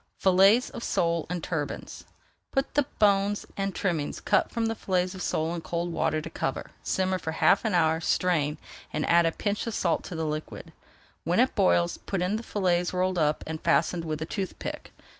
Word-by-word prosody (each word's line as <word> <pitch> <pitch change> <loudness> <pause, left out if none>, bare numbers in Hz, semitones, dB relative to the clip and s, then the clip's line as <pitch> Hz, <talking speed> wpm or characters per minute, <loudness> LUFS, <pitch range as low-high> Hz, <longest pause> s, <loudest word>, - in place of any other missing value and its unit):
FILLETS 195 +6 +5
OF 235 - -7
SOLE 170 -1 0
IN 180 0 -3
TURBANS 150 -4 -4 0.5
Put 270 0 -1
the 290 -2 +2
bones 200 0 +3
and 195 -1 -2
trimmings 165 -7 -1
cut - - +2
from 230 -1 -1
fillets 185 -3 -1
of 190 - -8
sole 160 -1 -1
in 170 - -4
cold 170 +1 -3
water 155 -1 0
to - - -7
cover, - - -3
simmer 185 0 0
for 160 -1 -4
half 195 - +4
an 220 -5 0
hour, 160 -1 +3
strain, 160 -4 +1 0.3
and 150 - -2
add 170 0 +5
a - - +1
pinch 205 +6 -2
of 230 - -3
salt 170 -3 0
to 175 - -6
the 160 0 -2
liquid. 155 0 -5 0.5
When - - +1
it - - +3
boils, 85 -1 +2
put 190 -3 -2
in 195 +4 0
the - - -5
fillets 180 -5 0
rolled 185 0 +1
up, 150 -1 +1
and 160 0 -5
fastened 170 0 +2
with 155 -2 -3
a - - -4
toothpick. 190 +2 -5
180 Hz, 195 wpm, -27 LUFS, 160-195 Hz, 0.5 s, FILLETS